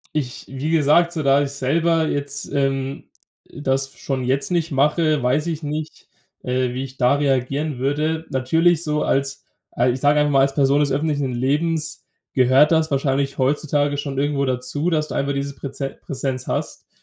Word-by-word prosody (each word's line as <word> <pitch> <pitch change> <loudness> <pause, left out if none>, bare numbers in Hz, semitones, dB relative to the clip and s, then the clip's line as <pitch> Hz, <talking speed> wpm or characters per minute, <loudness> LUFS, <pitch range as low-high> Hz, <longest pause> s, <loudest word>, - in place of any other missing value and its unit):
Ich 130 -5 -3
wie 135 +4 -3
gesagt, 165 +2 +4
so 160 - -2
da 140 0 +4
ich 140 - -4
selber 160 +4 +1
jetzt, 145 -1 -3
ähm, 135 -1 -1 0.4
äh, - - -11
das 135 -1 -1
schon 135 -2 -3
jetzt 135 +2 0
nicht 170 -2 0
mache, 150 +2 +2
weiß 130 +5 +1
ich 160 -2 -3
nicht, 150 +1 -6 0.3
äh, 125 0 -1
wie 130 +1 -3
ich 135 0 -9
da 125 +2 +3
reagieren 140 +1 0
würde. 150 +5 -1
Natürlich 160 +6 +2
so 150 -1 0
als, 135 0 -1 0.3
a 120 - +1
ich 125 +1 0
sage 145 +2 +3
einfach 150 0 +2
mal, 135 - +4
als 135 0 +1
Person 140 0 +3
des 145 -2 +1
öffentlichen 145 -1 0
Lebens 150 +5 -1 0.3
gehört 130 +4 +5
das 160 -1 +3
wahrscheinlich 140 0 0
heutzutage 145 +1 +1
schon 140 -1 -4
irgendwo 140 0 0
dazu, 130 +5 -2
dass 155 -2 0
du - - -5
einfach 140 +1 0
dieses 140 0 -3
Präze 135 0 -5
Präsenz 130 -2 -4
hast. - - -4
140 Hz, 180 wpm, -21 LUFS, 135-150 Hz, 0.4 s, gehört